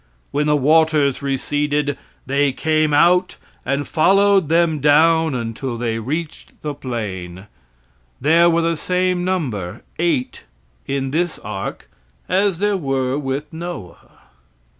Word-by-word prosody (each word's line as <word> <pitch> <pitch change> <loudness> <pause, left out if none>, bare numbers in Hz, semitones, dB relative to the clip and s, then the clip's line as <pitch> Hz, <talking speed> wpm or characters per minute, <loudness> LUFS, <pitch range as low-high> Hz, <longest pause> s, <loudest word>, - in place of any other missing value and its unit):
When 150 +1 0
the 150 - +3
waters 150 -1 +3
receded, 145 +1 -1 0.3
they 140 +1 +1
came 155 +1 +1
out 175 +5 +3 0.3
and 140 +1 -2
followed 195 +1 +3
them 165 -2 +2
down 160 +1 +4
until 115 +1 -4
they 115 -1 -2
reached 150 +7 -5
the 150 -1 -3
plain. 100 -9 -6 0.7
There 165 +5 +4
were 165 0 +2
the 165 -1 0
same 180 +1 0
number 130 - -3 0.2
eight 160 - -1 0.4
in 135 -1 -2
this 170 +2 -1
ark - - -6 0.4
as 190 -1 +1
there 205 +1 +1
were 135 -5 -1
with 140 +2 -4
Noah. 165 - -9
150 Hz, 120 wpm, -20 LUFS, 135-170 Hz, 0.7 s, down